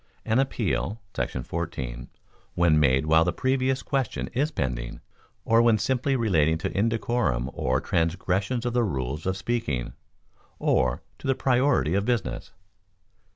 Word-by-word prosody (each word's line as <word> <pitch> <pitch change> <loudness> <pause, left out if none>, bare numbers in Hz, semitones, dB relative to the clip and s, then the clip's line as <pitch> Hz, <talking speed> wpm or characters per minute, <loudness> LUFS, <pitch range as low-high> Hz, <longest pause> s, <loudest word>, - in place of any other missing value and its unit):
—An 115 +2 +2
Appeal 115 -4 -1
[§ 60 0 -3
14] 65 -8 -4 0.5
when 85 -3 +4
made 65 -1 +3
while 80 +1 +5
the 85 - +1
Previous 130 +4 0
Question 135 -5 -2
is 140 +5 +1
pending, - - -3 0.5
or 115 +1 +5
when 115 -2 +4
simply 130 +5 0
relating 80 - +2
to 80 - -3
indecorum 110 - 0
or 65 +1 0
transgressions 95 +8 -1
of 120 - -1
the 120 -1 +2
rules 70 - -3
of 95 0 0
speaking, 95 - -2 0.6
or 65 -1 +1 0.2
to - - -6
the 135 - +3
priority 130 - +2
of 100 +1 +1
business. 110 - -2
95 Hz, 140 wpm, -26 LUFS, 75-120 Hz, 0.6 s, while